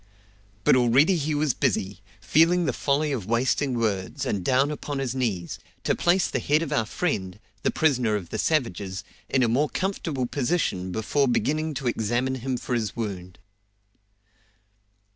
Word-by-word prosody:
But - - +5
already 130 +8 +4
he 155 -2 -1
was 145 -3 +1
busy, 95 -3 -1 0.2
feeling 165 - +3
the - - 0
folly 145 +2 0
of 115 -9 -3
wasting 125 +3 +1
words, 100 -5 -1
and 100 -3 -1
down 135 +7 +2
upon 145 -1 -4
his 135 -3 -2
knees, 105 -10 -2 0.2
to - - +2
place 180 +2 +2
the - - -2
head 150 +3 +2
of 150 -2 -3
our 115 -7 +1
friend, 100 - -2 0.2
the - - +1
prisoner 125 -8 +2
of 90 -5 -4
the - - -4
savages, 100 - -1 0.3
in 130 - +2
a - - +3
more 135 +7 +2
comfortable 165 -8 -2
position 120 - -1
before 120 +8 +1
beginning 150 +6 0
to 135 - -3
examine 120 +3 0
him 130 0 -2
for 125 - -4
his 110 -4 -1
wound. 95 -5 -5
130 Hz, 160 wpm, -25 LUFS, 105-150 Hz, 0.3 s, But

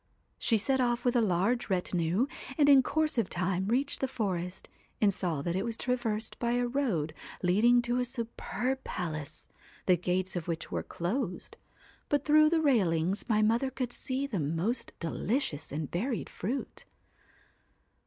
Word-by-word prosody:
She 225 - +3
set 265 +5 +1
off 240 0 0
with 245 0 +2
a 240 - +5
large 210 +5 +1
retinue, 180 +2 +1 0.3
and 290 -2 +5
in 275 -2 +8
course 305 0 0
of 215 - 0
time 185 +1 -1
reached 260 +6 +1
the 265 - +2
forest, 185 -7 -3 0.3
and 205 -2 +4
saw 165 -7 -2
that 170 +2 -1
it 190 - 0
was 230 -1 -3
traversed 235 -3 -1
by 235 0 +1
a 245 0 +2
road 235 - 0 0.3
leading 230 +7 +4
to 240 +1 0
a - - +2
superb 250 +1 -3
palace, 155 -5 -5 0.4
the 180 - +5
gates 180 +2 -1
of 175 -3 -3
which 165 -2 -3
were - - -1
closed, 185 +2 -3 0.5
but 290 -1 +1
through 305 0 +6
the 325 0 +2
railings 190 - +2
my 215 -1 +3
mother 230 +5 +2
could 255 -2 -3
see 265 +1 -2
the 230 -10 -2
most 165 - -1
delici 205 - -1
ous 145 +1 -7
and 150 0 -4
varied 230 +7 -2
fruit. 250 +9 -4
225 Hz, 165 wpm, -30 LUFS, 180-255 Hz, 0.5 s, in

